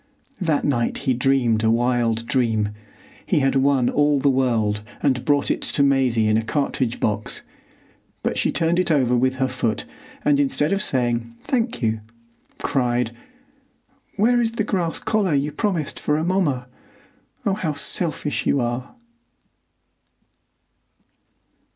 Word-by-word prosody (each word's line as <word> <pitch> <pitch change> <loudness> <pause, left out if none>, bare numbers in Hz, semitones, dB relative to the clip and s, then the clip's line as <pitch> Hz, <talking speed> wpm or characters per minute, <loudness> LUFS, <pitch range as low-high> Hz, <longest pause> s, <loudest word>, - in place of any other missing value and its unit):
That 160 -5 +1
night 120 -5 0
he 130 - +3
dreamed 120 -3 +2
a 110 - +3
wild 115 -1 +1
dream. 115 -4 +1 0.5
He - - +1
had 135 0 +1
won 135 -2 +3
all 145 +1 +2
the 140 +1 +3
world 115 -6 +1 0.2
and 130 -4 +1
brought 145 -1 +2
it - - -2
to 140 - +1
Maisie 130 -5 +2
in 110 0 +3
a - - +2
cartridge 125 0 -1
box, 105 0 -1 0.8
but - - -1
she - - +1
turned 170 +1 +1
it 185 - +1
over 130 -6 +3
with 130 +2 +2
her 130 0 0
foot, 125 -4 -2 0.4
and, 145 -1 +4
instead 145 +4 +1
of 195 - 0
saying 120 - 0
"Thank 240 - -1
you," 110 0 +1 0.6
cried—"Where 245 - -2
is 230 -1 0
the 225 - -1
grass 180 -5 -1
collar 200 -8 0
you 140 +2 0
promised 175 -6 -2
for 150 - 0
Amomma? 160 -6 0 0.8
Oh, 200 - +2
how 165 -7 -2
selfish 155 0 -1
you 140 - +3
are!" 120 - -3
135 Hz, 140 wpm, -22 LUFS, 120-165 Hz, 0.8 s, and